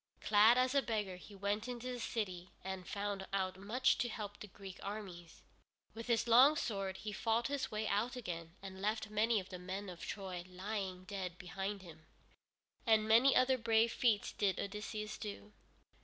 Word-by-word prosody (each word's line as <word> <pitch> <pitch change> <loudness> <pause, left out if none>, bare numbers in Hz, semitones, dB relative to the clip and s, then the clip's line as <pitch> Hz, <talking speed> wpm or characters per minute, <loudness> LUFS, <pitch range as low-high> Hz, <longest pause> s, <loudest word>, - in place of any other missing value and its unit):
Clad 215 +3 +6
as 255 +1 +3
a 280 - +4
beggar 210 -7 -2
he 200 +3 -12
went 205 +3 -1
into 250 0 -4
the 245 - -5
city 185 -6 -3
and 190 -1 -5
found 200 -1 -3
out 190 -1 0
much 225 +7 +2
to 240 - +1
help 205 -2 -6
the 210 - -7
Greek 195 -1 -10
armies. 190 -5 -7 0.5
With 230 +1 -7
his 235 -1 +2
long 255 +6 +8
sword 195 -8 -2
he 215 - -5
fought 230 +4 +1
his 285 -1 -1
way 215 0 -2
out 225 +6 0
again, 170 -8 -5
and 190 -1 -8
left 215 +1 -1
many 215 +1 +3
of 190 - -8
the 180 -1 -7
men 190 +2 -5
of 175 -2 -9
Troy 185 -3 -5
lying 185 0 -4
dead 185 -2 -5
behind 195 +2 -4
him. 160 -3 -13 0.8
And 220 -3 +4
many 235 +5 +6
other 255 0 +4
brave 225 0 +3
feats 225 -5 +2
did 200 -3 0
Odysseus 210 +1 -4
do. 210 0 -7
205 Hz, 180 wpm, -36 LUFS, 190-225 Hz, 0.8 s, long